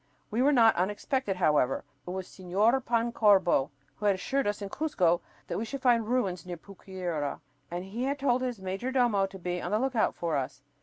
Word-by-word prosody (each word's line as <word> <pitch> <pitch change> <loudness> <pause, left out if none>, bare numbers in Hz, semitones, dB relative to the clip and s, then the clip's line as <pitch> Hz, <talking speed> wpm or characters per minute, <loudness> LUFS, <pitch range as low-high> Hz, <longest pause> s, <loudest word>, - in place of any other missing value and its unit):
We 225 +4 +1
were 280 +3 +5
not 230 -5 +6
unexpected, 205 +4 -1
however. 150 -7 +2 0.2
It - - -4
was 185 +1 -4
Señor 205 +8 +1
Pancorbo 215 - +3 0.3
who 210 - -1
had 200 - +4
assured 270 +7 -1
us 205 0 -1
in 200 -1 -5
Cuzco 185 - +1 0.2
that - - -3
we - - -2
should 265 +4 -6
find 235 -3 +3
ruins 195 -8 0
near 180 -1 -6
Pucyura 180 -5 -5 0.3
and 175 +2 -4
he 225 +6 -3
had 280 +1 -1
told 255 -3 +1
his 250 -4 -3
major 190 +7 -3
domo 235 -7 +2
to 190 0 -10
be 180 -1 -3
on - - -3
the 210 - +2
look 260 +2 -1
out 220 - +2
for 165 -4 -1
us. 135 0 -4
200 Hz, 205 wpm, -29 LUFS, 180-245 Hz, 0.3 s, not